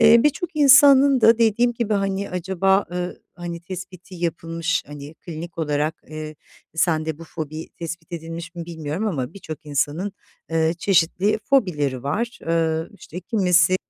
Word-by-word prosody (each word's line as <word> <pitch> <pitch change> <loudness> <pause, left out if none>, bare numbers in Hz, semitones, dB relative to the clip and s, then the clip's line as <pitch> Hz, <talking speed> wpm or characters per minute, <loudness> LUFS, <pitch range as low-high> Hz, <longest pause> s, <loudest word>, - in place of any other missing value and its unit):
Eee, 230 +1 +8
birçok 310 +3 0
insanın 275 -2 +7
da 225 +1 +6
dediğim 235 +1 +3
gibi 230 -2 -1
hani 195 0 -1
acaba, 190 +2 +1
ııı, 180 0 -4
hani, 170 -1 -6
tespiti 185 0 -9
yapılmış, 165 -1 -2
hani, 145 +1 -9
klinik 165 +1 -8
olarak, 150 0 0
eee, 155 0 -6 0.4
sende 160 -2 +1
bu 165 - -9
fobi 155 -1 -6
tespit 170 0 -7
edilmiş 165 +1 -6
mi, 170 - -5
bilmiyorum 160 +4 -3
ama 145 -5 -3
birçok 155 -6 -9
insanın, 150 +7 -1 0.4
ııı, 160 0 +2
çeşitli 185 +3 +2
fobileri 150 - +1
var. 225 - -2
Iıı, 165 0 0
işte, 180 +4 -8
kimisi 185 -2 +3
175 Hz, 145 wpm, -22 LUFS, 160-200 Hz, 0.4 s, Eee